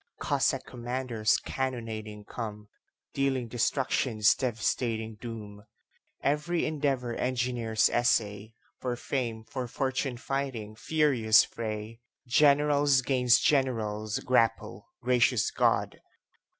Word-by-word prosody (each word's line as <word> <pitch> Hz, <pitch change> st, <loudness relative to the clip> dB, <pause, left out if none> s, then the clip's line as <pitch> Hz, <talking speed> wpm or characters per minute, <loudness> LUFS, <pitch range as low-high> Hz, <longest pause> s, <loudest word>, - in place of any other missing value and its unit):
Cossack -, -, 0 dB
commanders 120 Hz, -2 st, -1 dB
cannonading 110 Hz, -5 st, -5 dB
come, 105 Hz, -3 st, -7 dB, 0.4 s
Dealing 135 Hz, -3 st, 0 dB
destruction's 120 Hz, -2 st, +1 dB
devastating 115 Hz, -2 st, -2 dB
doom. 105 Hz, -3 st, -8 dB, 0.6 s
Every 150 Hz, +4 st, 0 dB
endeavor 140 Hz, -6 st, -1 dB
engineers 120 Hz, -3 st, 0 dB
essay, 110 Hz, -2 st, 0 dB, 0.2 s
For 125 Hz, -1 st, -2 dB
fame, 120 Hz, -3 st, -3 dB
for 125 Hz, +2 st, -5 dB
fortune 130 Hz, 0 st, -2 dB
fighting 130 Hz, -5 st, -4 dB
furious 130 Hz, -6 st, +4 dB
fray! 110 Hz, 0 st, -6 dB, 0.2 s
Generals 145 Hz, 0 st, +4 dB
'gainst 125 Hz, -2 st, +3 dB
generals 110 Hz, -6 st, 0 dB
grapple 125 Hz, -3 st, 0 dB, 0.2 s
gracious 125 Hz, -3 st, +2 dB
God! -, -, +1 dB
120 Hz, 90 wpm, -28 LUFS, 110-130 Hz, 0.6 s, furious